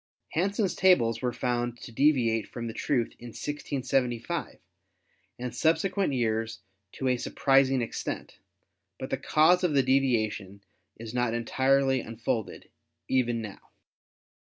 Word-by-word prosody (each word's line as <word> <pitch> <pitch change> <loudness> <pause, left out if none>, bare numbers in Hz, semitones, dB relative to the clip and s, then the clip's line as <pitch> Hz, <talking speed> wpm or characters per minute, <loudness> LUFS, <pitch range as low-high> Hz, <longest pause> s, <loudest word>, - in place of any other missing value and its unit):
Hansen's 195 +3 0
tables 130 -12 +3
were 125 -1 0
found 120 -1 -2
to 125 - -9
deviate 115 -4 +2
from 120 - -6
the 115 - -4
truth 120 0 -1
in 120 - -9
1675 130 -2 -2 0.8
and 125 -1 -5
subsequent 165 - +1
years 115 -2 -1 0.3
to 135 - -3
a 125 -1 +2
surprising 135 0 +2
extent, 115 - -5 0.6
but - - -7
the - - +1
cause 175 +4 +4
of 165 -5 +1
the 135 - +4
deviation 110 -7 0 0.3
is 115 0 -8
not 125 -2 0
entirely 130 +2 +2
un 115 0 -9
folded 110 -1 -3 0.4
even 120 -3 +1
now. 105 -3 -8
125 Hz, 130 wpm, -28 LUFS, 115-140 Hz, 0.8 s, cause